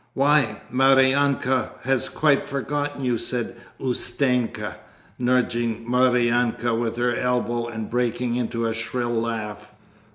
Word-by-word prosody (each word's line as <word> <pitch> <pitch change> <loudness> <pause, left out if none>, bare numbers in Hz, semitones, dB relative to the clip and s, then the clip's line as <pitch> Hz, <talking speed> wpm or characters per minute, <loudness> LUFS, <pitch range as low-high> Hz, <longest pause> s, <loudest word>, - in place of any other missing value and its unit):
'Why, 135 -6 +2
Maryanka 135 -1 +3
has 130 0 +1
quite 150 -3 +2
forgotten 145 0 -3
you,' 120 -2 +1
said 120 0 -2 0.2
Ustenka, 125 -1 0 0.4
nudging 120 -2 0
Maryanka 120 -1 +2
with 115 0 -1
her 120 0 +1
elbow 120 -1 0
and 110 -2 -5
breaking 120 0 -1
into 115 -1 -2
a 115 - 0
shrill 120 +1 -3
laugh. 105 -2 -3
120 Hz, 110 wpm, -23 LUFS, 115-130 Hz, 0.4 s, Maryanka